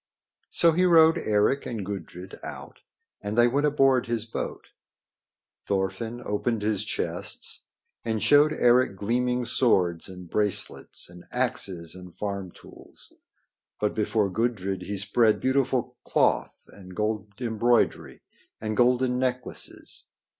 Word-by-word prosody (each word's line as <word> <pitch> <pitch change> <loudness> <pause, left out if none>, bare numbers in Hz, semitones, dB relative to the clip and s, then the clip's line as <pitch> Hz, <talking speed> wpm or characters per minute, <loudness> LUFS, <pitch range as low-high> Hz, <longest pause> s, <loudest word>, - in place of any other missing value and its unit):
So 170 - +4
he 175 +3 +2
rowed 165 -2 +6
Eric 105 +6 +1
and 110 -5 -4
Gudrid 95 -2 -7
out - - -9 0.4
and 105 +2 -4
they 120 0 +6
went 140 +4 +2
aboard 135 -4 +3
his 115 -2 -2
boat. 115 - -6 1.0
Thorfinn 100 +5 -2
opened 105 +1 -1
his 105 -1 +1
chests - - -3 0.4
and 110 -2 -2
showed 145 +1 +6
Eric 125 -6 +3
gleaming 125 +4 0
swords 90 -9 +2
and 90 -1 -10
bracelets 105 +2 -2
and 90 0 -14
axes 100 -10 -2
and 90 -1 -11
farm 100 -2 -4
tools. - - -15 0.7
But 105 - 0
before 105 -2 0
Gudrid 100 -4 -1
he 100 +2 -4
spread 105 +2 +3
beautiful 130 -2 0
cloth - - +1
and 95 -2 -13
gold 105 -1 -2
embroidery 120 0 +1 0.4
and 110 0 -3
golden 125 +1 +3
necklaces. 125 -1 -4
110 Hz, 125 wpm, -26 LUFS, 100-125 Hz, 1.0 s, rowed